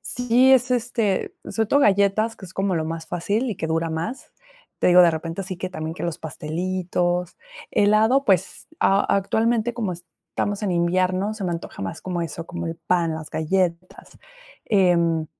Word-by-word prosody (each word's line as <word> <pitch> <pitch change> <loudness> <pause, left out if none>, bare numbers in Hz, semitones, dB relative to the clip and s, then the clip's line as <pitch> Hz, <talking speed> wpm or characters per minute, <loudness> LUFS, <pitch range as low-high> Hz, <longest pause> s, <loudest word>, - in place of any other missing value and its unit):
sí, 245 +2 +3
es 255 -1 +4
este 230 -5 0
sobre 220 -1 -1
todo 285 +7 +3
galletas, 200 +1 +3
que 190 - -10
es 180 - -14
como 195 -1 0
lo 160 -2 -1
más 165 0 -5
fácil 205 +8 -1
y 205 - -4
que 160 - -3
dura 165 +1 -1
más. 165 +11 -5 0.5
Te - - +3
digo, 180 0 +8
de 175 - +6
repente 165 +3 -4
así 185 -1 -6
que 185 - -4
también, 160 -3 -5
que - - -8
los 170 -1 -3
pastelitos. 175 +3 -2 0.3
Helado, 220 +6 +3
pues, 190 -7 0
a 195 +1 +4 0.2
actualmente, 225 +4 0
como 220 -6 -2
estamos 175 +4 -5
en 205 - 0
invierno 185 +4 +1
se 215 - -7
me 180 - -1
antoja 170 -11 -6
más 95 - -5
como 180 -2 -3
eso, 165 +1 -6
como 175 -1 -5
el 165 0 -4
pan, 170 -1 0
las 155 -1 -7
galletas, 180 +2 -2 0.5
em, 170 -5 +2
185 Hz, 180 wpm, -23 LUFS, 170-210 Hz, 0.5 s, digo